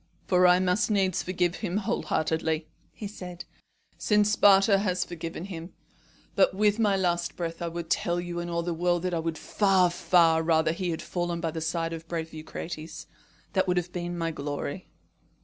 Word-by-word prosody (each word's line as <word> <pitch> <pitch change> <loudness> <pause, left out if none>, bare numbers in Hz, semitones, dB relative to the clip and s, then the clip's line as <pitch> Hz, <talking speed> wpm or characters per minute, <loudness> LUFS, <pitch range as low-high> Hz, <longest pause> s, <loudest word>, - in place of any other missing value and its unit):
"For 180 -1 +4
I 180 0 +6
must 185 +5 +1
needs 190 -4 +1
forgive 180 -1 -1
him 195 -3 -2
wholeheartedly," 160 -5 -1 0.2
he 210 - -7
said, 180 -4 -8 0.5
"since 210 -1 +3
Sparta 195 -1 +5
has 185 -3 0
forgiven 165 0 -6
him; 175 -2 -8 0.6
but 190 -2 +3
with 210 +2 +2
my 205 -3 +3
last 175 -2 0
breath 165 -1 -4
I 170 - -1
would 170 0 -5
tell 175 0 +1
you 175 0 -4
and 175 0 -4
all 170 0 -1
the 175 0 -2
world 175 +1 0
that 180 -1 -1
I 170 - 0
would 165 0 -3
far, 190 -4 +2
far 170 -2 +4
rather 160 -1 +2
he 175 +2 -3
had 160 - -3
fallen 175 -1 -2
by 165 -1 -2
the 160 0 -5
side 165 +1 -1
of 165 - -5
the - - -29
brave 165 -1 -4
Eucrates. 155 +1 -7 0.5
That 190 -2 +2
would 180 0 +1
have 180 0 -2
been 175 0 -4
my 165 -1 -1
glory." 145 +3 -5
175 Hz, 190 wpm, -27 LUFS, 165-185 Hz, 0.6 s, I